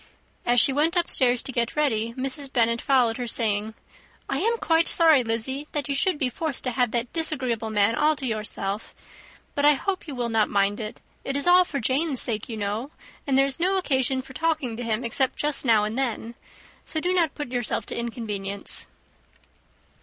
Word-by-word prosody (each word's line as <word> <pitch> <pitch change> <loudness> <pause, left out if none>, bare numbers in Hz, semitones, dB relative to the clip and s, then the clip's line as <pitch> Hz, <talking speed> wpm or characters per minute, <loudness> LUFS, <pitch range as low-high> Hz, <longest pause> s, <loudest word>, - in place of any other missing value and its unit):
As 245 0 +4
she 270 - +4
went 310 +5 +1
upstairs 255 -8 +2
to - - -3
get 235 -2 -1
ready, 230 -6 0
Mrs. 270 +1 +1
Bennet 235 -1 +2
followed 245 -4 +2
her, 245 -1 -4
saying, 220 -2 0 0.5
"I - - -1
am 465 +2 +1
quite 330 -5 +2
sorry, 320 -6 +5
Lizzy, 240 +6 -2
that 295 -2 -2
you 280 - -1
should 305 +4 +2
be 270 - +1
forced 295 +2 -2
to 255 - -1
have 245 -1 +1
that 235 +1 -3
disagreeable 255 -9 -2
man 210 0 +2
all 300 +5 +2
to 280 - -6
yourself; 210 -2 -3 0.6
but 285 - -1
I 295 +1 +7
hope 375 +5 -3
you 285 - -6
will 240 -1 -2
not 220 -2 +2
mind 200 +1 +1
it. 215 -1 -6 0.2
It 275 - -3
is 285 - 0
all 360 +1 +7
for 285 -5 -4
Jane's 270 +3 0
sake, 220 -2 -2
you 225 - -5
know; 210 +6 -3 0.4
and 270 -1 +2
there 270 - +5
is 275 +1 -2
no 375 +3 +1
occasion 265 -6 0
for 265 - -13
talking 310 -6 -1
to 240 - -6
him 230 +1 -1
except 260 +3 +1
just 295 -2 -1
now 220 -4 +4
and 215 +1 -2
then; 235 -3 -2 0.5
so 315 - -3
do 355 +3 0
not 335 -5 +1
put 295 -4 -5
yourself 245 -3 -2
to - - -5
inconvenience." 210 -5 -2
255 Hz, 200 wpm, -25 LUFS, 225-295 Hz, 0.6 s, I